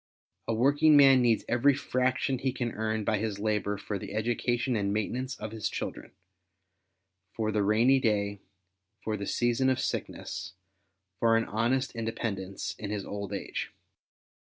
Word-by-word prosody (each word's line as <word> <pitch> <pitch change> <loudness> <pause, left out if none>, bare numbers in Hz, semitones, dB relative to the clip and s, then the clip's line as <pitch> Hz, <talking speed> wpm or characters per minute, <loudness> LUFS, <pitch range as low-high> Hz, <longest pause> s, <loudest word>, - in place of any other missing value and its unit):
A 115 - +1
working 145 +5 +5
man 135 -2 +7
needs 115 -2 +2
every 130 +4 +3
fraction 130 -1 0
he 130 0 0
can 125 -2 -3
earn 110 0 -2
by 105 0 +1
his 105 -2 -2
labour 105 -1 -1
for 100 0 -4
the 100 - -7
education 120 +3 0
and 100 -2 0
maintenance 125 +5 -2
of 110 0 -6
his 110 -2 -2
children, - - -5 1.2
for 110 -1 -1
the 105 0 +1
rainy 115 +6 +4
day, 100 -4 0 0.6
for 110 - -1
the 100 -1 -5
season 120 +2 +1
of 130 0 +1
sickness, 95 -6 -4 0.7
for 115 -1 +4
an 115 - 0
honest 120 +4 0
inde 115 -1 -3
pendence 95 -4 -4
in 105 - -5
his 105 -2 -3
old 100 -1 -5
age. 100 - -4
115 Hz, 160 wpm, -29 LUFS, 105-125 Hz, 1.2 s, man